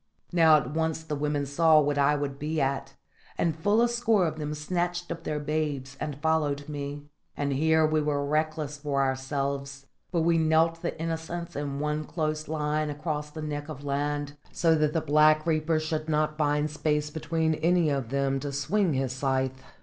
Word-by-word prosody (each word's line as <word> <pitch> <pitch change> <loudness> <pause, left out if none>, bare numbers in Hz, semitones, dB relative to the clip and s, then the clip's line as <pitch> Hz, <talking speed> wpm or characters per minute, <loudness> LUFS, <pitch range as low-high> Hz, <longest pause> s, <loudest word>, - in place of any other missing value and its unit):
Now 160 -3 +7
at 130 -2 -3
once 160 0 -1
the 155 -2 -3
women 145 0 -1
saw 155 +2 +5
what 145 -1 +1
I 140 +1 +4
would 140 -1 -3
be 155 +2 -2
at, 135 -1 -1 0.4
and 165 -3 +1
full 205 +8 +3
a - - +4
score 230 -5 +2
of 155 -1 -3
them 150 0 -3
snatched 175 +3 -2
up 165 0 -6
their 150 - -1
babes 145 -3 -2
and 145 -2 -4
followed 150 -2 0
me. 145 -1 -5 0.3
And 140 -1 0
here 160 +3 +3
we 155 0 +2
were 145 -1 0
reckless 155 0 -1
for 145 -2 0
ourselves; 135 +1 -2 0.3
but 170 -2 +1
we 165 0 +3
knelt 160 +1 +3
the 170 - -4
innocents 165 +1 -4
in 140 -1 -3
one 150 +1 -1
close 155 -1 -2
line 150 0 -1
across 150 0 -3
the 155 +1 -7
neck 145 0 -4
of 145 -2 -7
land, 145 +1 -2 0.2
so 165 -1 +3
that 150 -1 +2
the 165 - +1
Black 155 0 +4
Reaper 160 0 +1
should 155 0 -3
not 155 0 +1
find 150 0 +1
space 150 -1 0
between 160 +1 0
any 170 0 +2
of 135 -5 -2
them 135 0 0
to 145 +1 -4
swing 160 +4 +1
his 130 -1 0
scythe. 130 0 -1
150 Hz, 190 wpm, -27 LUFS, 145-160 Hz, 0.4 s, Now